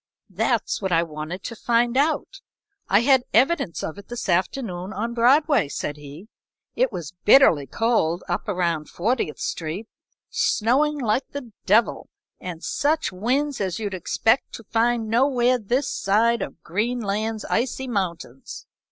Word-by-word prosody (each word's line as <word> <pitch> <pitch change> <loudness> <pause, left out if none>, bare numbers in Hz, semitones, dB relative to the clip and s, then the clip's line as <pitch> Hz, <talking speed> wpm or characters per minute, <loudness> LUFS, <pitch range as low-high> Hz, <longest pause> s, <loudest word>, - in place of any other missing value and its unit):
"That's - - 0
what 190 -2 -2
I 165 0 +3
wanted 160 +3 -6
to 230 - -6
find 235 +1 +1
out. 310 +7 0 0.5
I 200 +3 +5
had 265 +1 +4
evidence 270 - +2
of 160 - -5
it 200 - -13
this 240 -4 -5
afternoon 185 0 -1
on 230 +4 -3
Broadway," 260 - +4
said 145 - -4
he. 150 +7 -11 0.5
"It - - +2
was 165 -1 -6
bitterly 190 - +6
cold 185 - 0
up - - -2
around 170 -5 -1
Fortieth 210 -4 -1
Street, 170 +7 -4 0.4
snowing 300 - +1
like 250 0 0
the 270 -5 -7 0.2
devil, 215 +4 +2 0.3
and 175 -2 -7
such 305 -2 0
winds 255 +8 -1
as 185 -3 -1
you'd 205 -3 -4
expect 225 - +1
to 230 - -8
find 230 +1 +1
nowhere 250 +1 +2
this 245 +6 0
side 230 +4 +2
of - - -7
Greenland's 215 +1 -2
icy 265 +2 -1
mountains. 170 - -4
225 Hz, 145 wpm, -23 LUFS, 180-255 Hz, 0.5 s, bitterly